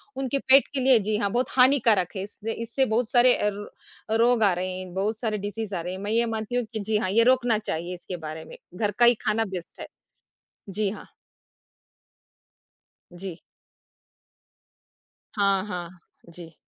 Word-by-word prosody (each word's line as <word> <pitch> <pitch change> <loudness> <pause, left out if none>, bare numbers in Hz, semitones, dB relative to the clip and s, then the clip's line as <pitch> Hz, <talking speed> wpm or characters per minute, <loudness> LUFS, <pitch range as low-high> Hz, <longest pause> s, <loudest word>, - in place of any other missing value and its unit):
उनके 270 +1 -2
पेट 265 +1 +5
के 275 - -1
लिए 260 -2 +5
जी 210 +1 -1
हाँ, 205 -2 0
बहुत 245 +3 0
हानिकारक 235 -9 +4
है। 190 - -3
इससे 215 +2 -6
इससे 230 +4 -1
बहुत 225 0 0
सारे 245 0 +5
अ, 210 - +1 0.6
र - - +2
रोग 240 -2 +3
आ 200 - +5
रहे 185 +1 -3
हैं, 185 -1 -9
बहुत 205 +4 -1
सारे 220 -2 -2
डिज़ीज़ 205 0 -5
आ 170 - -2
रहे 180 +2 -5
हैं। 190 - -6
मैं 205 +1 -3
यह 235 +1 +2
मानती 220 +1 -4
हूँ 245 - +1
कि 220 - -3
जी 210 +1 0
हाँ, 185 - -1
ये 225 +4 +4
रोकना 245 -2 +3
चाहिए 175 -4 -4
इसके 180 0 -7
बारे 160 +1 -7
में, - - -12 0.2
घर 205 +2 0
का 240 - +7
ही 240 - +7
खाना 225 -1 0
बेस्ट 185 -4 -8
है। - - -7 0.8
जी 205 +1 -1
हाँ। 210 - -10 2.0
जी। 175 -1 -7 2.0
हाँ, 200 -2 +2
हाँ। 175 -4 -5 0.5
जी। 165 -2 -11
215 Hz, 180 wpm, -25 LUFS, 190-235 Hz, 2.0 s, का